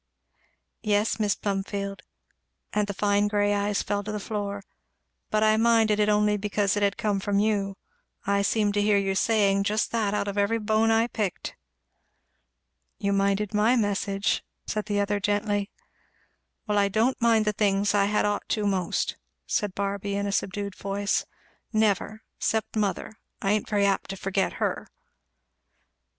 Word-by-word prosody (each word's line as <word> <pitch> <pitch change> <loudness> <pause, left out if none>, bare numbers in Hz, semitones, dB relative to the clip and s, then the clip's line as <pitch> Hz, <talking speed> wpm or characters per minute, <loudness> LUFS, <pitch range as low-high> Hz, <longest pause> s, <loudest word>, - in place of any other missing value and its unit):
"Yes, 210 +1 +1
Mis' 205 -2 +2
Plumfield," 200 0 -3 0.7
and 210 -1 +1
the 200 - -3
fine 205 0 +2
grey 205 0 +1
eyes 205 0 0
fell 205 0 -2
to 215 - -5
the 210 - -3
floor, 200 -1 -4 0.7
"but 215 0 +2
I 215 0 +4
minded 225 -2 +3
it 210 0 +3
only 210 0 +3
because 205 0 0
it 205 - -1
had 200 -1 +1
come 205 -2 0
from 200 +1 -1
you. 200 -2 0 0.5
I 200 0 +2
seemed 205 0 +1
to 205 - +1
hear 205 0 +3
you 195 -1 0
saying 200 -1 +2
just 215 +2 0
that 215 -3 0
out 205 - -1
of 200 0 -2
every 200 +3 +2
bone 220 +1 +2
I 225 +1 +4
picked." 210 -6 -3 1.4
"You 200 -3 0
minded 200 +1 +1
my 215 +4 +3
message," 200 -2 0 0.2
said 215 -1 -3
the 205 -2 0
other 205 0 0
gently. 205 0 0 1.0
"Well 210 -2 +1
I 200 - +3
don't 225 +6 +1
mind 225 -2 +4
the 210 - +1
things 200 -1 +1
I 200 -1 +3
had 210 +1 +1
ought 205 0 -2
to 210 -2 0
most," 190 -3 -1 0.3
said 205 -3 -1
Barby 200 0 -2
in 200 0 -1
a 200 - -1
subdued 200 0 -2
voice, 200 +1 -1 0.4
"never! 215 0 0 0.2
'cept 220 0 -1
mother 210 +1 -2 0.2
I 200 -4 0
ain't 210 -1 0
very 205 -2 +2
apt 195 -1 0
to 195 - -5
forget 195 0 -1
her." - - -2
205 Hz, 165 wpm, -26 LUFS, 200-215 Hz, 1.4 s, I